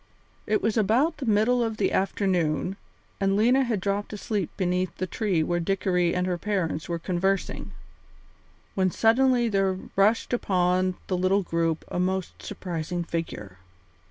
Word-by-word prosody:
It 215 Hz, -, +1 dB
was 220 Hz, +1 st, +1 dB
about 245 Hz, -, +2 dB
the 265 Hz, -, -5 dB
middle 225 Hz, +3 st, +3 dB
of 225 Hz, -1 st, -2 dB
the -, -, +1 dB
afternoon, 185 Hz, -2 st, 0 dB, 0.4 s
and 195 Hz, -1 st, +2 dB
Lena 250 Hz, +5 st, +4 dB
had 235 Hz, -5 st, -1 dB
dropped 200 Hz, +2 st, -2 dB
asleep 205 Hz, -3 st, -2 dB
beneath 180 Hz, -2 st, -1 dB
the 185 Hz, -, -1 dB
tree 185 Hz, -4 st, 0 dB
where 175 Hz, +2 st, 0 dB
Dickory 180 Hz, -1 st, +1 dB
and 180 Hz, 0 st, 0 dB
her 180 Hz, -1 st, -1 dB
parents 180 Hz, -6 st, -2 dB
were 170 Hz, -, -1 dB
conversing, 185 Hz, +3 st, -1 dB, 1.0 s
when 185 Hz, -1 st, +2 dB
suddenly 240 Hz, +4 st, +3 dB
there 195 Hz, -3 st, +1 dB, 0.2 s
rushed 210 Hz, +5 st, +2 dB
upon 185 Hz, -4 st, +1 dB
the 185 Hz, -, -1 dB
little 185 Hz, +2 st, +2 dB
group 165 Hz, -2 st, -1 dB
a -, -, -3 dB
most 185 Hz, 0 st, -2 dB
surprising 175 Hz, -3 st, -4 dB
figure. 105 Hz, -, -5 dB
190 Hz, 150 wpm, -26 LUFS, 175-210 Hz, 1.0 s, Lena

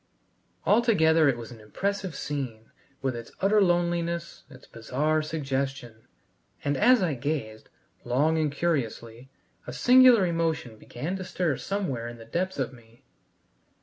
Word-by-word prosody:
Altogether 165 Hz, -9 st, +4 dB
it 125 Hz, -, 0 dB
was 120 Hz, +1 st, -9 dB
an 115 Hz, -, -11 dB
impressive 190 Hz, -, -3 dB
scene, 130 Hz, -7 st, -5 dB, 0.3 s
with 130 Hz, -2 st, -1 dB
its 115 Hz, 0 st, -8 dB
utter 205 Hz, +2 st, +3 dB
loneliness, 170 Hz, -2 st, 0 dB
its 130 Hz, -3 st, -15 dB
bizarre 145 Hz, +7 st, -1 dB
suggestion; 135 Hz, -6 st, -4 dB, 0.6 s
and 145 Hz, 0 st, 0 dB
as 245 Hz, -, +4 dB
I 165 Hz, -4 st, +1 dB
gazed, 130 Hz, -5 st, -4 dB, 0.3 s
long 140 Hz, +7 st, +1 dB
and 155 Hz, -2 st, 0 dB
curiously, 130 Hz, -6 st, -3 dB, 0.4 s
a -, -, -6 dB
singular 250 Hz, -5 st, +6 dB
emotion 165 Hz, -9 st, -2 dB
began 175 Hz, +13 st, -5 dB
stir 180 Hz, -5 st, -1 dB
somewhere 145 Hz, -, -3 dB
in 120 Hz, 0 st, -8 dB
the 115 Hz, -, -12 dB
depths 185 Hz, +10 st, -2 dB
of 135 Hz, -1 st, -2 dB
me. 115 Hz, -1 st, -19 dB
150 Hz, 135 wpm, -27 LUFS, 120-175 Hz, 0.6 s, singular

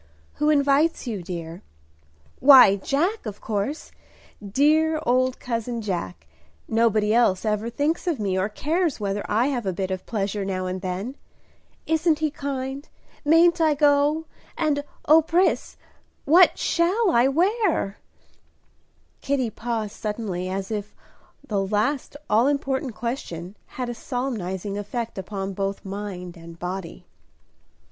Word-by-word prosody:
"Who 300 Hz, -, +2 dB
invites 285 Hz, +2 st, +3 dB
you, 220 Hz, -6 st, -3 dB
dear?" 170 Hz, -1 st, -7 dB, 0.8 s
"Why, 255 Hz, -8 st, +8 dB
Jack, 300 Hz, -, -1 dB
of 205 Hz, -1 st, -6 dB
course, 220 Hz, +8 st, -3 dB, 0.5 s
dear 305 Hz, +9 st, +2 dB
old 255 Hz, +1 st, +2 dB
cousin 235 Hz, -1 st, -3 dB
Jack. 95 Hz, -, -4 dB, 0.4 s
Nobody 220 Hz, -2 st, +2 dB
else 225 Hz, -4 st, +3 dB
ever 215 Hz, +1 st, 0 dB
thinks 295 Hz, +9 st, -1 dB
of 325 Hz, -8 st, 0 dB
me, 195 Hz, -3 st, -1 dB
or 190 Hz, +2 st, 0 dB
cares 315 Hz, -, -1 dB
whether 200 Hz, 0 st, -2 dB
I 230 Hz, +6 st, +2 dB
have 245 Hz, -7 st, -2 dB
a -, -, +1 dB
bit 190 Hz, +1 st, -3 dB
of 185 Hz, -1 st, -4 dB
pleasure 205 Hz, -2 st, -2 dB
now 185 Hz, -1 st, -2 dB
and 185 Hz, 0 st, -4 dB
then. 195 Hz, +9 st, -4 dB, 0.7 s
Isn't 320 Hz, 0 st, +2 dB
he 310 Hz, -1 st, -1 dB
kind? 275 Hz, 0 st, -5 dB, 0.3 s
Mayn't 335 Hz, +3 st, +5 dB
I 310 Hz, -2 st, +4 dB
go? 290 Hz, +2 st, +3 dB, 0.3 s
and, 290 Hz, -2 st, +1 dB, 0.2 s
O 315 Hz, +2 st, +7 dB
Pris, 340 Hz, +4 st, +1 dB, 0.5 s
what 345 Hz, +5 st, +6 dB
shall 365 Hz, +4 st, +2 dB
I 235 Hz, +2 st, +4 dB
wear?" 345 Hz, -, +1 dB, 1.2 s
Kitty 265 Hz, -5 st, 0 dB
paused 225 Hz, -3 st, -3 dB
suddenly, 210 Hz, -4 st, -3 dB
as 195 Hz, +2 st, -4 dB
if 210 Hz, -1 st, -4 dB, 0.5 s
the 205 Hz, -5 st, 0 dB
last 220 Hz, +9 st, -1 dB
all 225 Hz, +5 st, +3 dB
important 270 Hz, -3 st, -1 dB
question 200 Hz, -, -5 dB, 0.2 s
had 250 Hz, -1 st, -2 dB
a 240 Hz, -, -3 dB
solemnizing 210 Hz, -6 st, -4 dB
effect 225 Hz, +1 st, -4 dB
upon 195 Hz, 0 st, -4 dB
both 195 Hz, +1 st, -3 dB
mind 190 Hz, -3 st, -6 dB
and 165 Hz, 0 st, -12 dB
body. 180 Hz, 0 st, -6 dB
235 Hz, 135 wpm, -24 LUFS, 195-290 Hz, 1.2 s, Why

